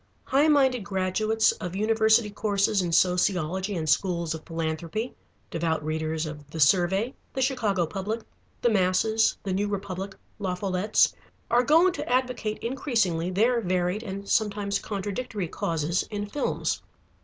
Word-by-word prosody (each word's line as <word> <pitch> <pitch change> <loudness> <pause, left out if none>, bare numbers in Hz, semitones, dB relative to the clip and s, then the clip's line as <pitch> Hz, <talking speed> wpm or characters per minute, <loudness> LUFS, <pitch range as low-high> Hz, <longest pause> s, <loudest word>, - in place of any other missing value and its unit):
High 280 +3 +3
minded 265 -6 +3
graduates 205 +3 +1
of 180 0 -6
university 220 +1 +3
courses 200 -1 +1
in 175 -2 -2
sociology 180 +2 +1
and 160 -2 -2
schools 170 +1 +1
of 160 - -7
philanthropy, 165 +7 -3 0.4
devout 160 -2 -1
readers 155 +1 -2
of 150 -2 -8
The 160 - -7
Survey, 190 - +3 0.2
The 265 - -2
Chicago 210 -9 +1
Public, 200 +7 -3 0.4
The 240 - +4
Masses, 215 +3 +2
The 195 - -2
New 200 +2 0
Republic, 195 -1 -4 0.2
La 185 -3 -1
Follette's, 190 +2 +2 0.4
are 240 - +5
going 330 +7 +4
to - - -5
advocate 250 -4 0
increasingly, 225 - 0
their 230 +6 +2
varied 180 +1 0
and 200 -2 -6
sometimes 200 -2 +1
contradictory 205 0 -4
causes, 165 +2 -1
in 205 -1 -3
films. 275 +8 -2
200 Hz, 140 wpm, -26 LUFS, 175-220 Hz, 0.4 s, are